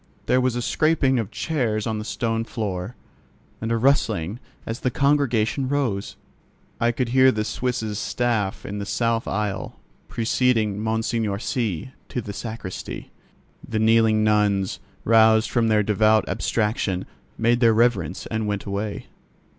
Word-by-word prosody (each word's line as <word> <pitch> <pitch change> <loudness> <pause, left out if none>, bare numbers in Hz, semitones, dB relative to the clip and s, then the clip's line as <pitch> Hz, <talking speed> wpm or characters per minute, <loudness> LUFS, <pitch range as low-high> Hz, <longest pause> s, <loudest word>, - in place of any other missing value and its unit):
There 130 - +3
was 125 -1 +1
a 120 - -2
scraping 145 -5 +2
of 110 -4 -3
chairs 115 -8 -1
on 110 -2 -2
the - - -4
stone 115 0 -1
floor, 105 -2 -4 0.7
and 115 +1 -2
a 115 - +2
rustling 110 - +1 0.3
as 115 +1 -4
the 125 - 0
congregation 135 -2 +1
rose. 125 -9 -1 0.6
I 120 0 +3
could 120 0 -2
hear 130 +1 +5
the 110 -2 -2
Suisse's 110 -2 -2
staff 115 -6 -1
in 105 0 -5
the 100 - -4
south 115 0 0
aisle, 105 -1 -3 0.3
preceding 115 -3 +1
Monseigneur 110 -2 -1
C—— 115 -1 -2 0.2
to - - -3
the 105 -3 -6
sacristy. 105 -2 -6 0.5
The 115 - -4
kneeling 110 0 +4
nuns, 105 -3 +2 0.2
roused 110 -1 +5
from 115 -1 +2
their 105 -1 +3
devout 110 +1 +3
abstraction, 105 -4 -1 0.3
made 120 +1 +2
their 115 -2 +5
reverence 105 -7 +1
and 110 -1 -2
went 100 -1 -2
away. 100 +1 -4
110 Hz, 145 wpm, -23 LUFS, 105-120 Hz, 0.7 s, hear